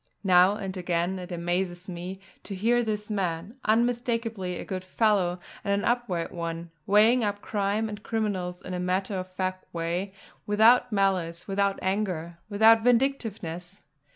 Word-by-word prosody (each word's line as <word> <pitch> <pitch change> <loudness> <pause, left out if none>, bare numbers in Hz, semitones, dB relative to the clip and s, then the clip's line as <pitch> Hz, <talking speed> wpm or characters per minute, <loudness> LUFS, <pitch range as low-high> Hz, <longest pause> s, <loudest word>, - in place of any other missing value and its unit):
Now 185 0 +6
and 195 -3 -5
again 180 +1 -1
it 180 +1 -8
amazed 175 +1 -2
me 180 +1 -6 0.3
to 200 - -5
hear 235 +5 +2
this 215 -2 -3
man, 190 +2 -2
unmistakably 230 -4 0
a - - -6
good 185 -1 -4
fellow 185 -2 +1 0.2
and 200 -1 +1
an - - -1
upright 235 -9 0
one, 170 0 -5 0.2
weighing 220 +4 +5
up 205 -1 -1
crime 205 +1 -1
and 210 -1 -7
criminals 195 -5 -2
in 185 - -6
a 180 - -2
matter 185 +2 -1
of 185 0 -6
fact 185 0 -4
way, 170 +3 -2 0.4
without 230 +4 +5
malice, 185 -4 0
without 200 0 +1
anger, 185 -4 -2
without 220 +2 +6
vindictiveness. 220 -8 0
195 Hz, 150 wpm, -27 LUFS, 180-215 Hz, 0.4 s, Now